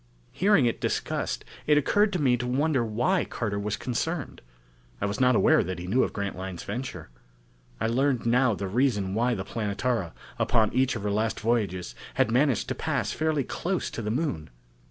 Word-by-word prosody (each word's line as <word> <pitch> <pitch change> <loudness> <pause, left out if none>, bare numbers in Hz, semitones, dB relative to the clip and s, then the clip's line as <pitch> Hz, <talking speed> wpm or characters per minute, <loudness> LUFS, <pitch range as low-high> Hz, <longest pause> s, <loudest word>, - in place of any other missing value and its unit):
Hearing 195 -8 +3
it 115 - -1
discussed, - - -2 0.2
it 150 -1 +5
occurred 205 +8 +3
to 180 - 0
me 130 -4 +3
to 120 +1 -3
wonder 135 +1 +1
why 120 - +1
Carter 105 -3 -3
was 105 0 -2
concerned. 145 +5 -3 0.6
I - - -1
was 100 +1 -2
not 125 -1 +4
aware - - +5
that 95 0 -4
he 90 - -6
knew 115 +8 +2
of - - +1
Grantline's 95 -3 -5
venture. 130 - -5 0.7
I - - -1
learned 125 +2 +1
now 120 -1 +3
the 100 0 -4
reason 105 -3 +1
why 120 +3 +1
the 95 -2 -4
Planetara, 105 -3 -2 0.3
upon 110 -1 +2
each 130 0 +2
of 105 - -5
her 105 - 0
last 110 +2 0
voyages, 105 -6 -1 0.2
had 115 - +2
managed 130 -1 +2
to - - 0
pass - - -1
fairly 155 -3 0
close 180 +7 -2
to - - -5
the 105 - -3
Moon. 110 - -2
120 Hz, 185 wpm, -27 LUFS, 100-135 Hz, 0.7 s, it